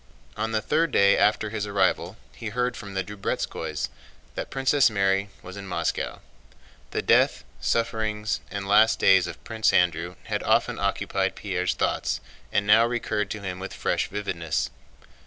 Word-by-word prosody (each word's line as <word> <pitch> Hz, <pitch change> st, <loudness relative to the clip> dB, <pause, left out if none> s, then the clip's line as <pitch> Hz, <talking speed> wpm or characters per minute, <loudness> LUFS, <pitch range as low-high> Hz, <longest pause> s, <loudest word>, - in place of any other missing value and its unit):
On 110 Hz, +1 st, -2 dB
the 110 Hz, -1 st, 0 dB
third 160 Hz, +4 st, +1 dB
day 100 Hz, -3 st, +5 dB
after 105 Hz, 0 st, +2 dB
his 105 Hz, -2 st, -3 dB
arrival 100 Hz, -1 st, +1 dB, 0.2 s
he 110 Hz, -, -6 dB
heard 125 Hz, +2 st, -1 dB
from 100 Hz, -2 st, -8 dB
the 95 Hz, -, 0 dB
Drubetskóys 105 Hz, 0 st, -3 dB, 0.4 s
that -, -, -5 dB
Princess 135 Hz, -1 st, +3 dB
Mary 100 Hz, -1 st, +1 dB
was 95 Hz, +1 st, -9 dB
in 100 Hz, -1 st, -8 dB
Moscow. 90 Hz, -, -2 dB, 0.7 s
The -, -, -2 dB
death, -, -, +3 dB, 0.2 s
sufferings, 110 Hz, -2 st, -1 dB
and 100 Hz, -1 st, -5 dB
last 110 Hz, +2 st, +5 dB
days 95 Hz, -2 st, +5 dB
of 85 Hz, -, -9 dB
Prince 110 Hz, -1 st, +1 dB
Andrew 90 Hz, 0 st, +1 dB
had -, -, -2 dB
often -, -, +2 dB
occupied -, -, 0 dB
Pierre's 90 Hz, -2 st, -1 dB
thoughts -, -, 0 dB, 0.3 s
and 100 Hz, -, +1 dB
now 110 Hz, +2 st, +6 dB
recurred 110 Hz, -4 st, -1 dB
to 105 Hz, -, -5 dB
him 95 Hz, -2 st, -5 dB
with 95 Hz, +1 st, -6 dB
fresh -, -, 0 dB
vividness. 90 Hz, -6 st, -2 dB
105 Hz, 155 wpm, -25 LUFS, 95-110 Hz, 0.7 s, now